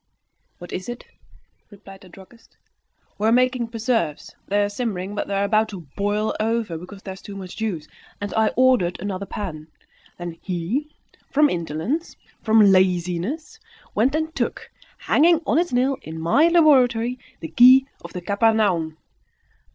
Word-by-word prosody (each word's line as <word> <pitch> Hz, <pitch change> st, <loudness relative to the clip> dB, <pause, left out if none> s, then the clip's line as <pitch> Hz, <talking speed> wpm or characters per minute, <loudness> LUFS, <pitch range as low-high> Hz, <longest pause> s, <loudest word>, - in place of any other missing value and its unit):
"What 175 Hz, -, -10 dB
is 185 Hz, +5 st, -5 dB
it?" 240 Hz, 0 st, -7 dB, 0.6 s
replied 195 Hz, -1 st, -14 dB
the 185 Hz, -, -15 dB
druggist. 195 Hz, +6 st, -17 dB, 0.6 s
"We 215 Hz, -, +1 dB
are -, -, +4 dB
making 250 Hz, 0 st, +2 dB
preserves; 225 Hz, -, -2 dB
they 205 Hz, +1 st, +2 dB
are -, -, +1 dB
simmering; 205 Hz, -3 st, -4 dB
but 205 Hz, -, -3 dB
they 200 Hz, -, -2 dB
were 200 Hz, -, +1 dB
about 215 Hz, +1 st, +2 dB
to 185 Hz, -5 st, -9 dB
boil 205 Hz, +2 st, -1 dB
over, 225 Hz, -4 st, -1 dB
because 185 Hz, +4 st, -10 dB
there 190 Hz, -, -6 dB
is 190 Hz, -, -13 dB
too 200 Hz, -, -9 dB
much 185 Hz, -2 st, -8 dB
juice, 190 Hz, -9 st, -3 dB, 0.3 s
and 205 Hz, 0 st, -5 dB
I 220 Hz, 0 st, +3 dB
ordered 250 Hz, -9 st, +3 dB
another 195 Hz, 0 st, -4 dB
pan. 160 Hz, -7 st, -6 dB, 0.5 s
Then 175 Hz, -1 st, -7 dB
he, 195 Hz, -, -3 dB, 0.4 s
from 295 Hz, 0 st, +3 dB
indolence, 170 Hz, -, -3 dB, 0.3 s
from 220 Hz, 0 st, +4 dB
laziness, 185 Hz, -, 0 dB, 0.3 s
went 250 Hz, +7 st, +2 dB
and 315 Hz, 0 st, -2 dB
took, -, -, -3 dB, 0.3 s
hanging 335 Hz, +1 st, +3 dB
on 310 Hz, -, +2 dB
its 350 Hz, 0 st, -1 dB
nail 255 Hz, +2 st, +1 dB
in 160 Hz, +1 st, -8 dB
my 170 Hz, -, +4 dB
laboratory, 255 Hz, -8 st, +3 dB, 0.2 s
the 160 Hz, -, -7 dB
key 255 Hz, +2 st, +7 dB, 0.2 s
of 170 Hz, -, -9 dB
the 180 Hz, -, -5 dB
Capharnaum." 200 Hz, -5 st, +1 dB
210 Hz, 160 wpm, -22 LUFS, 185-250 Hz, 0.6 s, key